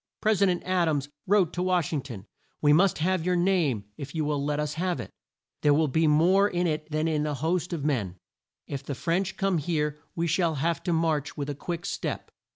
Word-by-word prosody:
Pres 215 -2 +2
i 200 - +6
dent 180 -1 0
Ad 185 -2 +1
ams 145 -2 -1 0.2
wrote 190 -4 +3
to 175 - -2
Wash 180 -4 +1
ing 145 - 0
ton, 115 -8 -9 0.3
"We 145 -1 +4
must 185 +5 +4
have 180 +1 +1
your 180 +1 +1
name, 175 - +1
if 140 +2 -8
you 155 -2 0
will 145 -1 -1
let 145 +1 -1
us 150 -1 -1
have 175 -1 -1
it. 115 - -7 0.5
There 145 -1 +4
will 155 +1 +3
be 160 +4 +2
more 180 +7 +4
in 175 -1 0
it 155 -1 -2
than 155 +1 0
in 155 -1 0
a 150 - -2
host 165 +5 -1
of 160 -5 -3
men! 110 -12 -1 0.5
If 140 -2 -5
the 140 - -4
French 180 +6 -1
come 195 -4 +1
here 150 -1 -1 0.2
we 170 - 0
shall 165 0 +1
have 160 +3 0
to 175 - +1
march 160 -3 0
with 145 0 -3
a - - -3
quick 170 +4 -5
step." - - -4
160 Hz, 230 wpm, -27 LUFS, 145-180 Hz, 0.5 s, i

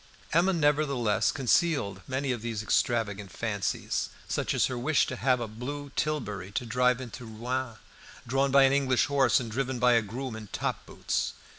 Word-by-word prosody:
Emma 175 +4 +4
nevertheless 145 - +2
concealed 130 - +1
many 130 +1 -1
of 120 -3 -3
these 115 -2 -3
extravagant 105 -3 0
fancies, 105 -4 -2 0.2
such - - -1
as - - +3
her 130 - -2
wish 145 +6 +2
to 130 - -4
have 130 0 +2
a 120 - -3
blue 140 +6 -6
tilbury 105 -12 -2
to 120 - -2
drive 125 +2 +2
into 125 0 -8
Rouen, 120 +2 -4 0.5
drawn 135 +3 +1
by 135 0 +6
an 135 0 +5
English 135 -3 +3
horse 135 -4 +3
and 115 -3 -5
driven 130 +2 -2
by 125 0 +4
a 115 - +5
groom 120 +3 -5
in 110 -1 -8
top - - -3
boots. - - -2
125 Hz, 175 wpm, -28 LUFS, 115-135 Hz, 0.5 s, by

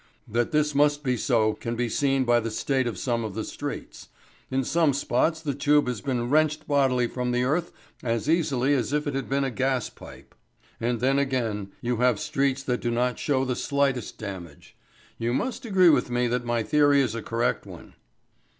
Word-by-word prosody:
That 120 +2 0
this 150 -1 +1
must 145 +1 +2
be 125 -2 +1
so 110 -2 +2
can 115 +2 -5
be 120 +1 -1
seen 135 +3 +1
by 120 -1 +3
the 115 0 -3
state 130 +3 0
of 115 -5 -4
some 115 +4 -1
of 105 -3 -5
the 110 - -2
streets. - - -7 0.4
In 135 0 0
some 160 +1 +2
spots 155 +4 0
the 145 -3 -2
tube 145 +1 +3
has 120 -5 -3
been 125 -3 -1
wrenched 155 +2 +1
bodily 135 -4 +2
from 125 +1 -3
the 125 0 +1
earth 160 +7 0 0.3
as 115 0 -2
easily 145 -5 +2
as 130 0 0
if 150 +1 0
it 145 - -2
had 135 -1 -3
been 140 +1 +1
a 135 - -1
gaspipe. 130 -1 -4 0.5
And 120 0 -1
then, 135 +2 +3
again, 115 -8 -1
you 120 -1 -1
have 125 -2 +2
streets 135 -1 0
that 125 -3 -1
do 120 - -1
not 125 +1 0
show 135 -3 +1
the 125 -1 -1
slightest 140 -3 -1
damage. 90 -8 -9 0.4
You 120 +2 0
must 260 - -3
agree 190 -5 +5
with 150 - +3
me 125 0 +1
that 125 0 -1
my 120 -1 0
theory 145 +4 +4
is 130 -5 +1
a 115 - -4
correct 115 +2 -1
one." - - -12
130 Hz, 200 wpm, -26 LUFS, 120-140 Hz, 0.5 s, agree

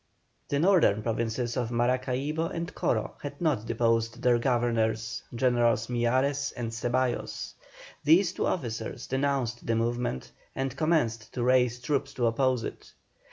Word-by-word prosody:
The 140 - 0
northern 160 - +4
provinces 115 +1 -1
of 120 -3 -1
Maracaibo 130 +6 0
and 170 0 -5
Coro 60 0 -1
had 145 0 -7
not 150 -10 0
deposed 115 -1 0
their 120 -1 +4
governors, 115 -2 0
Generals 120 -2 +2
Miyares 130 +4 +1
and 115 -2 -3
Ceballos. 120 +2 -2 0.5
These 170 +4 +5
two - - -1
officers 115 -5 -3
denounced 130 -3 -1
the 115 - +2
movement, 120 - -2 0.2
and 135 -1 -2
commenced 140 -9 0
to 125 - -1
raise 125 -1 +3
troops 140 +2 -2
to 120 - 0
oppose 125 +1 +1
it. - - -8
120 Hz, 135 wpm, -28 LUFS, 115-135 Hz, 0.5 s, These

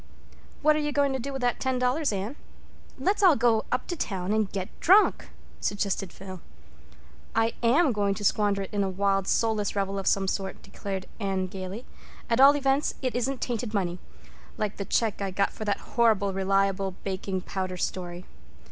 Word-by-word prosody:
"What 305 0 +5
are - - +1
you 295 -1 -1
going 285 -1 +2
to 265 - -1
do 275 +3 -4
with 270 -2 -4
that 245 -1 +1
ten 260 -1 0
dollars, 255 +4 +1
Anne? 205 +6 -3 0.6
Let's 390 +11 +1
all 365 -6 +7
go 230 -2 +2
up 255 - +1
town 200 - -2
and 215 -3 +1
get 190 -2 -3
drunk," 395 +5 +4 0.3
suggested 200 -2 -1
Phil. 185 -1 -9 0.9
"I 225 +1 +2
am 270 +6 +4
going 200 -3 +1
to 205 - -6
squander 205 -1 +2
it 195 - -10
in 205 -1 +1
a 195 - 0
wild 195 0 +1
soulless 215 -3 +1
revel 195 0 -1
of 195 - -4
some 195 -1 +2
sort," 190 0 -3
declared 195 -1 -5
Anne 195 -2 -1
gaily. 190 +5 -6 0.5
"At 230 +3 +4
all 280 +2 +9
events 275 0 +1
it 255 - 0
isn't 255 +2 -1
tainted 235 -2 -2
money—like 80 - -5
the 200 - -3
check 220 -1 0
I 195 - -1
got 195 +1 0
for 215 - -6
that 205 -1 0
horrible 215 -4 +3
Reliable 195 0 +1
Baking 190 -1 -3
Powder 185 -1 -4
story. 175 0 -4
200 Hz, 180 wpm, -27 LUFS, 190-245 Hz, 0.9 s, all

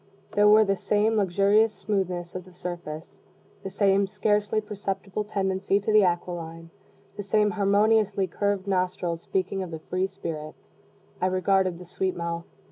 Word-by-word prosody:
There 205 0 +5
were 215 +1 +7
the 195 0 +1
same 210 +3 +1
luxurious 200 +3 +3
smoothness 185 -5 -2
of 185 0 -8
surface, 170 -3 -7 0.4
the 195 - -5
same 195 0 +2
scarcely 210 +1 +1
perceptible 200 -1 -4
tendency 195 -1 0
to 210 +2 -1
the 215 -1 +7
aquiline, 165 -2 -3 0.5
the 205 - -4
same 210 +1 +2
harmoniously 205 0 +2
curved 200 +1 -1
nostrils 180 -3 -1
speaking 195 +1 -2
the 160 - -5
free 185 +4 -2
spirit. 165 -6 -6 0.7
I 185 - +3
regarded 185 -1 +1
the 180 - -11
sweet 185 +1 -2
mouth. 170 0 -4
195 Hz, 140 wpm, -26 LUFS, 180-205 Hz, 0.7 s, were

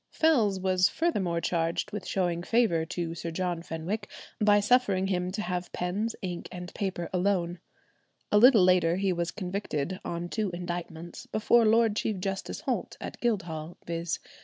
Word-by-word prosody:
Fells 230 -12 +3
was 185 0 +3
furthermore 190 - 0
charged 170 +1 -1
with 205 -3 -5
showing 175 -3 0
favour 175 -5 +2
to 170 -1 -3
Sir 170 0 -5
John 175 0 -2
Fenwick 175 +6 -4 0.3
by 205 -1 +5
suffering 205 -3 +3
him 180 -2 0
to 210 - -2
have 180 0 -3
pens, 200 +6 -2
ink, 175 -2 -4
and 180 0 -7
paper 190 -4 -3
"alone;" 180 -2 +1 0.7
a 210 - +6
little 235 -4 +8
later 180 -2 +4
he 190 0 +1
was 170 0 -1
convicted 185 -3 -3
on 170 0 -3
two 215 +2 -1
indictments 175 -1 -6
before 230 +2 +3
Lord 225 -1 +4
Chief 215 -1 -1
Justice 195 +1 -3
Holt - - -2
at - - -7
Guildhall, 170 -8 -2
viz. 170 -1 -2
185 Hz, 160 wpm, -28 LUFS, 170-205 Hz, 0.7 s, little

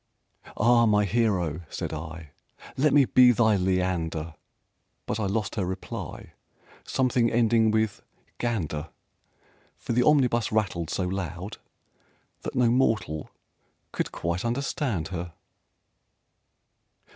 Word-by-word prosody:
"Ah, 115 +1 +5
my 105 -1 +3
Hero," 95 -7 0
said - - -4
I, 80 -1 -7 0.4
"Let 145 +2 +3
me 140 -1 +6
be 125 0 +6
thy 110 -2 +3
Leander!" 90 -4 -1 0.7
But - - -3
I 105 - 0
lost 105 +1 -1
her 105 - -1
reply 95 -1 -6 0.5
Something 125 -2 +2
ending 115 -1 +3
with 110 -1 0 0.4
"gander" 85 -10 -2 0.9
For - - -4
the 125 - +3
omnibus 125 -5 +3
rattled 95 -7 -1
so 95 - -1
loud 90 +1 -4 0.8
that - - -6
no 120 -2 +3
mortal 110 - 0 0.6
could - - -2
quite 85 +2 -3
understand 120 - -2
her. 85 -2 -5
105 Hz, 110 wpm, -26 LUFS, 85-120 Hz, 0.9 s, me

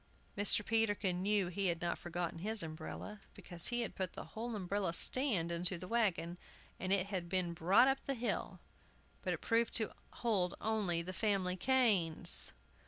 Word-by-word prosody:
Mr. 205 0 +4
Peterkin 205 -5 +1
knew 200 -1 +1
he 195 +2 -2
had 170 -2 -1
not 175 -1 -2
forgotten 175 -1 -5
his 215 +2 +2
umbrella, 165 +6 -8
because 175 -2 -1
he 240 0 0
had 235 - -4
put 185 -2 -4
the - - -7
whole 230 +1 -5
umbrella 195 -2 -2
stand 200 - +4
into 175 +2 -1
the 180 +2 -9
wagon, 180 -6 -1 0.4
and 185 - -3
it 195 -2 +2
had 175 -2 -3
been 180 -2 -1
brought 180 +9 +4
up 270 0 0
the 275 - -1
hill, 240 0 -3 0.6
but - - -2
it - - -4
proved 230 0 0
to 220 -2 +2 0.2
hold 200 -7 0
only 200 -6 -1
the 185 +2 -6
family 195 -4 0
canes! 185 - +3
190 Hz, 170 wpm, -35 LUFS, 175-220 Hz, 0.6 s, Mr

